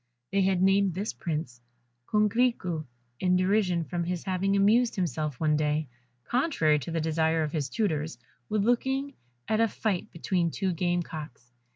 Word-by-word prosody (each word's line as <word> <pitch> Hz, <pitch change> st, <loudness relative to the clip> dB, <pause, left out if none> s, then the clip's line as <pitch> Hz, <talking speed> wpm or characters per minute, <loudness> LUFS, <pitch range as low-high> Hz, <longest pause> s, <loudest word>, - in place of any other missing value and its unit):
They 200 Hz, 0 st, +2 dB
had 190 Hz, -1 st, +2 dB
named 195 Hz, -2 st, +3 dB
this 200 Hz, +3 st, -2 dB
prince, 150 Hz, -8 st, -4 dB, 0.5 s
Coquerico, 210 Hz, -6 st, +1 dB, 0.3 s
in 180 Hz, -1 st, +2 dB
derision 185 Hz, -2 st, +2 dB
from 175 Hz, +1 st, -3 dB
his 175 Hz, 0 st, -3 dB
having 195 Hz, +1 st, 0 dB
amused 225 Hz, +5 st, +4 dB
himself 155 Hz, -7 st, -2 dB
one 155 Hz, -1 st, +2 dB
day 150 Hz, -1 st, 0 dB, 0.3 s
contrary 235 Hz, -, +2 dB
to 145 Hz, -, -7 dB
the 165 Hz, 0 st, -1 dB
desire 160 Hz, 0 st, +1 dB
of 150 Hz, -, -3 dB
his 145 Hz, -4 st, -2 dB
tutors 155 Hz, -, -1 dB, 0.3 s
with 210 Hz, -1 st, +1 dB
looking 265 Hz, +4 st, +1 dB, 0.3 s
at 220 Hz, +1 st, +2 dB
a 230 Hz, -, +4 dB
fight 205 Hz, -4 st, -2 dB
between 170 Hz, 0 st, 0 dB
two 190 Hz, +2 st, -1 dB
game 175 Hz, +1 st, 0 dB
cocks. 150 Hz, -7 st, -9 dB
180 Hz, 160 wpm, -28 LUFS, 160-200 Hz, 0.5 s, amused